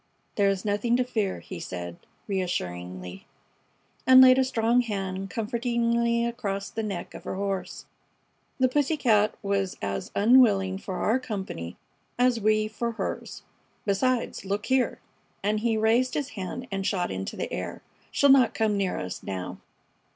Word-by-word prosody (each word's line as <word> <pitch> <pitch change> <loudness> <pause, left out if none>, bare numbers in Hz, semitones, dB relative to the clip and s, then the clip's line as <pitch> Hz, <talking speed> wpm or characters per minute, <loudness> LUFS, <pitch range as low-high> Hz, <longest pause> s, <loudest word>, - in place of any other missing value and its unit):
"There 200 -1 +3
is 195 0 -2
nothing 210 +3 +1
to 255 - +2
fear," 220 -6 -2
he 185 - -8
said, 90 - -6 0.3
reassuringly, 90 - -4 0.8
and 260 0 +9
laid 260 0 +8
a - - +5
strong 235 -1 +2
hand 195 -4 -3
comfortingly 235 +2 0
across 205 -5 -3
the 225 - -3
neck 200 -5 -5
of - - -9
her - - -4
horse. 195 -1 -3 0.7
"The 260 - +5
pussy 290 +4 +1
cat 215 -6 +3
was 195 -1 -1
as 100 0 -3
unwilling 200 -4 +4
for 190 -1 -5
our 225 +7 +1
company 190 - -5 0.4
as 245 -2 +3
we 215 0 +3
for 230 +2 -3
hers. - - -5 0.4
Besides, 235 +5 0
look 200 +2 -2
here!" 260 -1 +1 0.5
and 210 +1 +1
he 225 0 +1
raised 230 +4 +2
his 285 -2 -1
hand 220 +4 -6
and 195 0 -2
shot 180 -2 0
into 95 0 -4
the - - -4
air. - - -5 0.3
"She'll 285 - +3
not 260 -4 +5
come 220 -2 +1
near 195 -2 0
us 90 0 -5
now." 90 -1 -5
210 Hz, 155 wpm, -27 LUFS, 190-235 Hz, 0.8 s, and